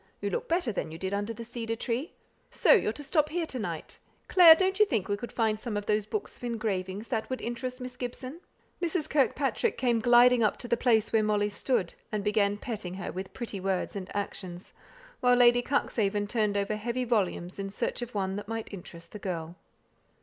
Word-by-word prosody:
You 200 Hz, 0 st, -2 dB
look -, -, -2 dB
better 335 Hz, -7 st, +1 dB
than 190 Hz, -, -3 dB
you 160 Hz, -, -7 dB
did 190 Hz, +3 st, -3 dB
under 205 Hz, +2 st, -1 dB
the 230 Hz, +1 st, -7 dB
cedar 230 Hz, -1 st, -4 dB
tree. 245 Hz, +6 st, -3 dB, 0.4 s
So -, -, +3 dB
you're 405 Hz, -, +3 dB
to 290 Hz, -, -8 dB
stop 300 Hz, +1 st, +2 dB
here 335 Hz, +1 st, -1 dB
to 260 Hz, -5 st, -5 dB
night? 170 Hz, -7 st, -5 dB, 0.3 s
Clare, 340 Hz, -3 st, +9 dB
don't 380 Hz, +3 st, 0 dB
you 425 Hz, -, +7 dB
think 220 Hz, -, 0 dB
we 205 Hz, -, 0 dB
could 235 Hz, +4 st, -7 dB
find 220 Hz, -2 st, 0 dB
some 220 Hz, -2 st, -3 dB
of 205 Hz, -, -3 dB
those 210 Hz, 0 st, +1 dB
books 430 Hz, -, -4 dB
of -, -, -19 dB
engravings 210 Hz, -3 st, -3 dB
that 225 Hz, -4 st, -2 dB
would 260 Hz, -, -2 dB
interest 250 Hz, +2 st, -4 dB
Miss 250 Hz, 0 st, -7 dB
Gibson." 255 Hz, +4 st, -6 dB, 0.4 s
Mrs. 335 Hz, -2 st, -1 dB
Kirkpatrick 285 Hz, -, +1 dB
came 240 Hz, -3 st, +2 dB
gliding 245 Hz, +1 st, +6 dB
up 215 Hz, -, +2 dB
to 245 Hz, -, -6 dB
the 235 Hz, -, +2 dB
place 230 Hz, -3 st, +2 dB
where 220 Hz, -, +5 dB
Molly 210 Hz, -1 st, +1 dB
stood; 205 Hz, -3 st, -1 dB, 0.2 s
and 210 Hz, -2 st, -2 dB
began 205 Hz, -1 st, +2 dB
petting 205 Hz, -6 st, -5 dB
her 190 Hz, -, -5 dB
with 190 Hz, +1 st, -6 dB
pretty 225 Hz, -5 st, -5 dB
words 190 Hz, +1 st, -1 dB
and 195 Hz, -1 st, -5 dB
actions, 185 Hz, -3 st, -5 dB, 0.5 s
while 245 Hz, 0 st, +4 dB
Lady 245 Hz, 0 st, +6 dB
Cuxhaven 210 Hz, -6 st, 0 dB
turned 210 Hz, -2 st, +1 dB
over 200 Hz, +1 st, -1 dB
heavy 235 Hz, +4 st, -2 dB
volumes 200 Hz, -6 st, -1 dB
in 195 Hz, 0 st, -3 dB
search 195 Hz, -, -3 dB
of 240 Hz, -2 st, -6 dB
one 190 Hz, -1 st, -1 dB
that 205 Hz, 0 st, -6 dB
might 225 Hz, -1 st, -5 dB
interest 170 Hz, -3 st, -10 dB
the 210 Hz, -, -8 dB
girl. 170 Hz, -3 st, -4 dB
225 Hz, 210 wpm, -29 LUFS, 200-250 Hz, 0.5 s, Clare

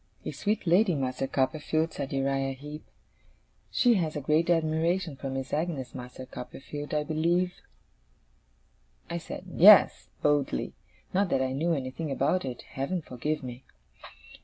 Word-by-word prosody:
'A -, -, -2 dB
sweet 210 Hz, 0 st, -1 dB
lady, 180 Hz, +1 st, +4 dB
Master 135 Hz, -1 st, -2 dB
Copperfield!' 155 Hz, +4 st, 0 dB
said 140 Hz, -2 st, -4 dB
Uriah 135 Hz, 0 st, 0 dB
Heep. 150 Hz, +3 st, -9 dB, 0.9 s
'She 245 Hz, -2 st, +4 dB
has 165 Hz, -7 st, 0 dB
a -, -, -1 dB
great 155 Hz, +4 st, +1 dB
admiration 165 Hz, 0 st, +1 dB
for 135 Hz, 0 st, -5 dB
Miss 135 Hz, 0 st, -4 dB
Agnes, 150 Hz, -4 st, -2 dB
Master 125 Hz, +1 st, -8 dB
Copperfield, 145 Hz, +4 st, -8 dB
I 150 Hz, -1 st, +1 dB
believe?' 170 Hz, +4 st, 0 dB, 1.5 s
I 170 Hz, -, -2 dB
said, 180 Hz, +2 st, -8 dB
'Yes,' 190 Hz, +3 st, +7 dB
boldly; 145 Hz, -2 st, +1 dB, 0.4 s
not 195 Hz, 0 st, +2 dB
that 130 Hz, -, +2 dB
I 130 Hz, -, -1 dB
knew 165 Hz, +5 st, +1 dB
anything 140 Hz, +2 st, -3 dB
about 140 Hz, +5 st, +1 dB
it, 125 Hz, -2 st, -6 dB
Heaven 155 Hz, +6 st, -3 dB
forgive 150 Hz, +4 st, -3 dB
me! 125 Hz, 0 st, -7 dB
150 Hz, 140 wpm, -28 LUFS, 135-170 Hz, 1.5 s, Yes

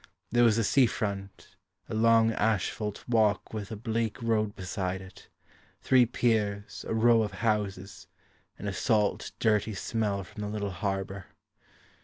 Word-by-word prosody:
There 120 Hz, +1 st, +4 dB
was 115 Hz, -2 st, +4 dB
a 115 Hz, -, +2 dB
sea 130 Hz, +4 st, +4 dB
front, 100 Hz, -3 st, -5 dB, 0.3 s
A -, -, -6 dB
long 115 Hz, 0 st, +4 dB
asphalt 105 Hz, -1 st, -1 dB
walk 110 Hz, -4 st, +1 dB
with 105 Hz, -3 st, -5 dB
a 110 Hz, -, -5 dB
bleak 115 Hz, 0 st, -2 dB
road 110 Hz, -3 st, 0 dB
beside 95 Hz, 0 st, -3 dB
it, 95 Hz, 0 st, -14 dB, 0.5 s
Three 125 Hz, -2 st, +4 dB
piers, 105 Hz, -4 st, -1 dB
a -, -, -2 dB
row 115 Hz, 0 st, +5 dB
of 105 Hz, -3 st, -2 dB
houses, 100 Hz, -2 st, -2 dB, 0.5 s
And 105 Hz, -, -6 dB
a 100 Hz, -, -2 dB
salt 105 Hz, 0 st, 0 dB
dirty 110 Hz, -1 st, +1 dB
smell 100 Hz, -1 st, -1 dB
from 100 Hz, +4 st, -10 dB
the 105 Hz, -, -3 dB
little 105 Hz, -1 st, -3 dB
harbour. 95 Hz, 0 st, -3 dB
105 Hz, 150 wpm, -29 LUFS, 100-115 Hz, 0.5 s, row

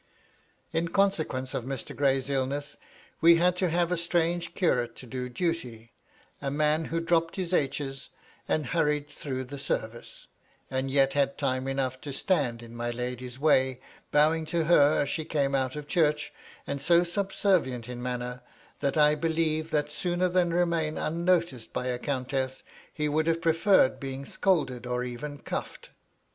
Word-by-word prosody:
In 165 Hz, +1 st, +1 dB
consequence 165 Hz, -9 st, 0 dB
of -, -, -2 dB
Mr. 135 Hz, +1 st, -5 dB
Gray's 135 Hz, -2 st, +1 dB
illness, 140 Hz, +1 st, -2 dB, 0.5 s
we 170 Hz, +1 st, +8 dB
had 180 Hz, +1 st, +3 dB
to 180 Hz, -1 st, +1 dB
have 170 Hz, +1 st, +1 dB
a 180 Hz, -, +1 dB
strange 170 Hz, 0 st, 0 dB
curate 125 Hz, -10 st, +1 dB
to -, -, -11 dB
do 125 Hz, +1 st, -5 dB
duty; 125 Hz, -6 st, -3 dB, 0.5 s
a 140 Hz, -, -1 dB
man 150 Hz, +2 st, +1 dB
who 165 Hz, +2 st, -2 dB
dropped 165 Hz, 0 st, +1 dB
his 185 Hz, -2 st, -3 dB
h's, 135 Hz, -3 st, -1 dB, 0.4 s
and 155 Hz, -, 0 dB
hurried 150 Hz, +1 st, +1 dB
through 130 Hz, -3 st, -4 dB
the 140 Hz, +2 st, -8 dB
service, 120 Hz, -3 st, -4 dB, 0.5 s
and 130 Hz, 0 st, -1 dB
yet 135 Hz, 0 st, +3 dB
had 140 Hz, -1 st, +1 dB
time 130 Hz, -2 st, -1 dB
enough 130 Hz, -1 st, -2 dB
to 145 Hz, -, -6 dB
stand 135 Hz, -8 st, 0 dB
in 115 Hz, 0 st, -11 dB
my 120 Hz, 0 st, -2 dB
lady's 125 Hz, +1 st, -5 dB
way, 130 Hz, -3 st, +3 dB, 0.3 s
bowing 155 Hz, +2 st, +4 dB
to 170 Hz, 0 st, 0 dB
her 150 Hz, -3 st, +5 dB
as -, -, -4 dB
she 160 Hz, -, -2 dB
came 145 Hz, -3 st, 0 dB
out 130 Hz, -1 st, 0 dB
of 150 Hz, -1 st, -6 dB
church, 150 Hz, -4 st, +1 dB, 0.3 s
and 140 Hz, -1 st, -3 dB
so 170 Hz, +4 st, +5 dB
subservient 175 Hz, -, 0 dB
in 125 Hz, -1 st, -6 dB
manner, 125 Hz, 0 st, -4 dB, 0.4 s
that 140 Hz, +1 st, 0 dB
I 150 Hz, 0 st, +5 dB
eUeve 160 Hz, 0 st, 0 dB
that 150 Hz, -1 st, 0 dB
sooner 175 Hz, +3 st, 0 dB
than 175 Hz, -1 st, +2 dB
remain 170 Hz, -3 st, +1 dB
un 165 Hz, +2 st, -2 dB
noticed 170 Hz, -10 st, +1 dB
by 125 Hz, -, -2 dB
a 125 Hz, -1 st, -1 dB
countess, 130 Hz, -1 st, -2 dB, 0.3 s
he 150 Hz, -1 st, -1 dB
would 155 Hz, +2 st, +1 dB
have 165 Hz, 0 st, +2 dB
preferred 165 Hz, -1 st, +3 dB
being 135 Hz, 0 st, -5 dB
scolded, 135 Hz, -, 0 dB
or 125 Hz, 0 st, -1 dB
even 140 Hz, +4 st, -6 dB
cuffed. -, -, -6 dB
145 Hz, 165 wpm, -28 LUFS, 130-165 Hz, 0.5 s, we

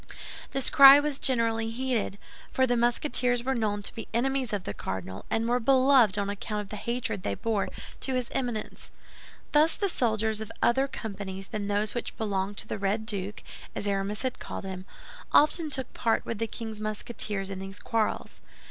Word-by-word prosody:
This 270 Hz, -1 st, +1 dB
cry 275 Hz, 0 st, +10 dB
was 290 Hz, -1 st, -1 dB
generally 230 Hz, -3 st, +1 dB
heeded; 235 Hz, -4 st, -2 dB, 0.3 s
for 260 Hz, -, +3 dB
the 245 Hz, -1 st, +1 dB
Musketeers 245 Hz, 0 st, +2 dB
were 265 Hz, +2 st, 0 dB
known 210 Hz, -4 st, -1 dB
to -, -, -4 dB
be 225 Hz, -, -7 dB
enemies 265 Hz, 0 st, 0 dB
of 205 Hz, -3 st, -2 dB
the -, -, -4 dB
cardinal, 95 Hz, 0 st, -6 dB
and 225 Hz, +1 st, 0 dB
were 245 Hz, +1 st, +2 dB
beloved 255 Hz, -4 st, +5 dB
on 200 Hz, -1 st, 0 dB
account 205 Hz, +1 st, -3 dB
of 205 Hz, -1 st, -6 dB
the 215 Hz, -, -5 dB
hatred 235 Hz, -3 st, -3 dB
they 100 Hz, -, -2 dB
bore 220 Hz, -, -1 dB, 0.3 s
to 265 Hz, -, -2 dB
his 250 Hz, -2 st, -1 dB
Eminence. 240 Hz, -5 st, -3 dB, 0.6 s
Thus 305 Hz, +2 st, +5 dB
the 400 Hz, -, +1 dB
soldiers 220 Hz, -, 0 dB
of 220 Hz, -, -6 dB
other 265 Hz, +3 st, +3 dB
companies 195 Hz, -6 st, -6 dB
than 210 Hz, -2 st, -3 dB
those 205 Hz, +1 st, 0 dB
which 240 Hz, -, -4 dB
belonged 200 Hz, -2 st, -2 dB
to -, -, -2 dB
the -, -, -4 dB
Red 200 Hz, +3 st, 0 dB
Duke, 205 Hz, -2 st, -4 dB, 0.3 s
as 205 Hz, -, -3 dB
Aramis 200 Hz, +3 st, -1 dB
had 260 Hz, -1 st, -2 dB
called -, -, -6 dB
him, 190 Hz, -1 st, -6 dB, 0.5 s
often 310 Hz, +2 st, +4 dB
took 265 Hz, -3 st, -3 dB
part 225 Hz, -2 st, 0 dB
with 230 Hz, -, -4 dB
the 225 Hz, -, 0 dB
king's 220 Hz, -2 st, -6 dB
Musketeers 210 Hz, -2 st, -2 dB
in 190 Hz, -, -5 dB
these 195 Hz, +1 st, -7 dB
quarrels. 225 Hz, -2 st, -2 dB
225 Hz, 185 wpm, -28 LUFS, 205-250 Hz, 0.6 s, cry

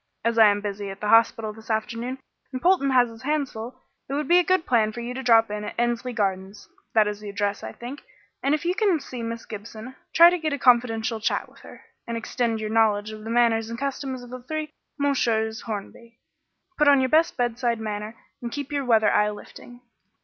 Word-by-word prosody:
As 230 Hz, 0 st, +1 dB
I 220 Hz, -, +9 dB
am 205 Hz, 0 st, +2 dB
busy 205 Hz, -1 st, -4 dB
at 195 Hz, 0 st, -8 dB
the 210 Hz, -, -3 dB
hospital 225 Hz, -1 st, +3 dB
this 220 Hz, +1 st, -15 dB
afternoon 230 Hz, +4 st, -2 dB, 0.3 s
and 255 Hz, -, -4 dB
Polton 345 Hz, -3 st, +3 dB
has 250 Hz, -2 st, +4 dB
his 225 Hz, -1 st, -13 dB
hands 290 Hz, 0 st, -1 dB
full, 240 Hz, +4 st, -9 dB, 0.3 s
it 275 Hz, -, -2 dB
would 295 Hz, -1 st, -2 dB
be 350 Hz, +3 st, +6 dB
a -, -, +3 dB
good 370 Hz, -2 st, +1 dB
plan 220 Hz, -3 st, +2 dB
for 240 Hz, -, -8 dB
you 240 Hz, +1 st, -5 dB
to 265 Hz, -, -5 dB
drop 225 Hz, -3 st, +4 dB
in 210 Hz, 0 st, -4 dB
at 210 Hz, -, -7 dB
Endsley 240 Hz, +1 st, -1 dB
Gardens 195 Hz, -2 st, -3 dB, 0.3 s
that 215 Hz, -1 st, +5 dB
is 210 Hz, 0 st, -4 dB
the 210 Hz, -1 st, -8 dB
address, 205 Hz, 0 st, -2 dB
I -, -, -6 dB
think 250 Hz, +5 st, -9 dB, 0.4 s
and 280 Hz, +2 st, +2 dB
if 310 Hz, -, -6 dB
you 350 Hz, -, +2 dB
can 390 Hz, -5 st, +2 dB
see 255 Hz, -3 st, -8 dB
Miss 230 Hz, 0 st, -5 dB
Gibson, 220 Hz, +4 st, -9 dB, 0.2 s
try 340 Hz, +1 st, +8 dB
to 360 Hz, -, -1 dB
get 310 Hz, -2 st, -1 dB
a -, -, -1 dB
confidential 235 Hz, -3 st, +2 dB
chat 215 Hz, -, -1 dB
with -, -, -20 dB
her, -, -, -14 dB, 0.2 s
and 235 Hz, 0 st, -3 dB
extend 230 Hz, -1 st, -2 dB
your 215 Hz, 0 st, -4 dB
knowledge 215 Hz, -2 st, +2 dB
of 215 Hz, 0 st, -9 dB
the 225 Hz, -, -7 dB
manners 230 Hz, -1 st, +2 dB
and 230 Hz, -, -5 dB
customs 265 Hz, -1 st, -4 dB
of 245 Hz, -, -12 dB
the 255 Hz, 0 st, -7 dB
three 310 Hz, +4 st, -5 dB, 0.3 s
Messieurs 230 Hz, -6 st, 0 dB
Hornby. 230 Hz, +2 st, -7 dB, 0.6 s
Put 300 Hz, -, +4 dB
on 285 Hz, -1 st, +7 dB
your 260 Hz, 0 st, +1 dB
best 320 Hz, +3 st, +3 dB
bedside 240 Hz, -1 st, 0 dB
manner 215 Hz, 0 st, -5 dB, 0.3 s
and 235 Hz, -1 st, -5 dB
keep 285 Hz, +1 st, -5 dB
your 285 Hz, -1 st, -1 dB
weather 225 Hz, -4 st, +3 dB
eye 210 Hz, 0 st, +3 dB
lifting. 245 Hz, +3 st, -11 dB
235 Hz, 225 wpm, -24 LUFS, 220-265 Hz, 0.6 s, I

